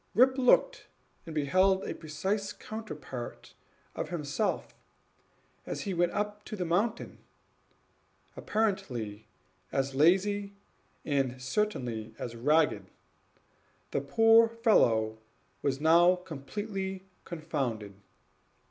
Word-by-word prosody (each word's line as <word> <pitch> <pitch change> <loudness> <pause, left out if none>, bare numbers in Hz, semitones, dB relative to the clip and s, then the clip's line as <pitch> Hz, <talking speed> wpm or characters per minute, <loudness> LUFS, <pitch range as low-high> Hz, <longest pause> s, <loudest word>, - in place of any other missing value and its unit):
Rip 260 +3 +6
looked, 265 - +3 0.4
and 160 - -7
beheld 185 +6 +3
a - - -3
precise 190 +6 -3
counterpart 215 - -8 0.4
of - - -4
himself, 170 +5 -2 0.9
as - - -5
he 195 - -3
went 175 0 +2
up 210 0 -3
the 200 -4 -4
mountain: 205 +7 -1 1.2
apparently 130 - -2 0.4
as 135 0 -1
lazy, 195 +7 +3 0.5
and 135 -4 0
certainly 125 - -2
as 120 -1 -6
ragged. 150 +6 +2 1.0
The - - 0
poor 225 0 +5
fellow 115 - +2 0.4
was 135 -1 0
now 170 +3 +6
completely 190 +4 -5 0.2
confounded. 135 - -3
175 Hz, 95 wpm, -30 LUFS, 135-210 Hz, 1.2 s, Rip